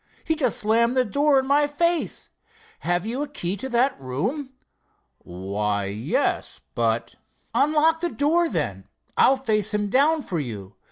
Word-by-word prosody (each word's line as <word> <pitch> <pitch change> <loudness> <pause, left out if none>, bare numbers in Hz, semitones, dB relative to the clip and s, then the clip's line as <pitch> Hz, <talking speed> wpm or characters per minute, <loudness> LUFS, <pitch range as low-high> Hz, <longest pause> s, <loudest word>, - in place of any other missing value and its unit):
He 320 - +1
just 270 -8 0
slammed 235 +4 +2
the 255 - +3
door 285 +6 +2
in 265 - -2
my 290 +2 +3
face. 335 +3 0 0.5
Have 175 +2 -1
you 240 +5 -3
a 295 - -2
key 195 -10 -2
to 265 +7 -5
that 245 - +1
room?" 200 - -3 0.7
"Why, 100 +3 -3
yes, 105 +4 -1
but——" 115 0 0 0.4
"Unlock 310 +2 +3
the 345 +1 -1
door, 330 +3 +1
then. 120 - -3 0.3
I'll 270 - +5
face 215 -5 +1
him 205 -1 -1
down 295 +4 +3
for 170 - -3
you. 105 -8 -7
235 Hz, 155 wpm, -24 LUFS, -, 0.7 s, I'll